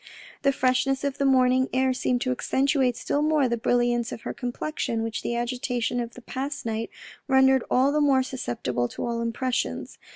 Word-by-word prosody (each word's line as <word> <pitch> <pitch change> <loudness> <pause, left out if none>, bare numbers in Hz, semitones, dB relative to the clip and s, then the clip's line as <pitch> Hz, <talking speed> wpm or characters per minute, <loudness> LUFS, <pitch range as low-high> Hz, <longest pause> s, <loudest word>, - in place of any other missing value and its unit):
The 275 - +3
freshness 265 +1 +1
of 280 -1 -2
the 280 - +3
morning 260 0 +3
air 260 0 +2
seemed 250 -1 0
to 255 - 0
accentuate 265 -1 +1
still 290 - -1
more 300 -3 +3
the 235 - 0
brilliance 240 0 +1
of - - -6
her - - -5
complexion 245 -2 -3
which 225 0 -3
the 235 - -2
agitation 245 0 -1
of 235 -1 -5
the 250 - -12
past 275 +2 -4
night 225 0 -2 0.4
rendered 265 -2 +4
all 265 +3 +3
the 300 +1 +1
more 270 -3 +4
sus 260 0 -6
ceptible 120 0 -1
to - - -4
all 235 -1 -2
impressions. 240 +2 -2
255 Hz, 190 wpm, -25 LUFS, 235-265 Hz, 0.4 s, rendered